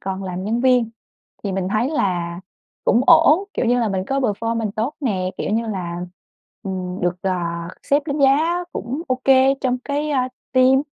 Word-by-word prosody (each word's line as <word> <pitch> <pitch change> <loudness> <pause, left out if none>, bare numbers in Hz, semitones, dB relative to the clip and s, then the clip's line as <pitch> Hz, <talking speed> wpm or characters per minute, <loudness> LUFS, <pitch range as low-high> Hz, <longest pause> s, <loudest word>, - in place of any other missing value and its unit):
còn 190 0 -4
làm 185 0 -4
nhân 225 +4 0
viên 250 -3 +3 0.5
thì 200 - -2
mình 190 -1 -2
thấy 215 +7 0
là 175 - -1 0.4
cũng 235 - +4
ổn, 325 +7 +6
kiểu - - 0
như 245 +1 +3
là, 230 - +1
mình 190 -2 -2
có 270 +4 0
performance 225 -1 -1
tốt 230 +7 -1
nè, 190 -9 -1
kiểu - - -2
như 225 +2 0
là, 180 -5 -4 0.7
ừm, 185 -1 -4
được, 180 0 0
ờ, 190 - +1 0.5
sếp 285 +1 +2
đánh 290 -1 -2
giá 315 +6 +3
cũng 260 +8 -4
ô 255 0 0
kê 270 0 +5
trong 255 -2 0
cái, 295 +1 -2
a, 255 -3 +1 0.2
team. 260 +1 +5
230 Hz, 185 wpm, -21 LUFS, 190-270 Hz, 0.7 s, ổn